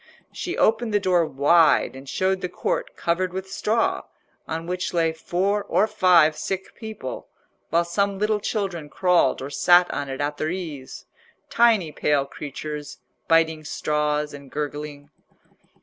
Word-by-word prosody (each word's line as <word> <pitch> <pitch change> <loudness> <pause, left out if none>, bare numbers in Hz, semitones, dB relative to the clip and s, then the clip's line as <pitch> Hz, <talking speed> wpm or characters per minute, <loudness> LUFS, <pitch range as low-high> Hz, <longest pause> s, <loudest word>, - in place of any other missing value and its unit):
She 360 - -5
opened 220 0 +2
the - - +5
door 180 -4 +2
wide 150 +2 +3
and 135 0 -10
showed 190 0 0
the 180 - -3
court - - -3
covered 180 +2 -1
with 190 0 -6
straw, 225 +2 0 0.4
on 165 +1 -4
which 180 +1 -3
lay 165 -1 +2
four 190 +5 -1
or 205 - +2
five 180 -7 +4
sick 190 +5 -4
people, 215 - -7 0.4
while 170 +2 +2
some 200 +3 0
little 210 +1 +1
children 195 -8 -3
crawled 175 -7 +2
or 140 - -6
sat 175 +5 +5
on 140 -1 -3
it 135 - -5
at 145 0 -2
their 155 - -1
ease—tiny 185 - -1
pale 145 -1 +1
creatures, 150 +1 -7 0.3
biting 160 -1 +3
straws 150 0 -1
and 140 -1 -11
gurgling. 145 0 -5
170 Hz, 145 wpm, -24 LUFS, 150-190 Hz, 0.4 s, the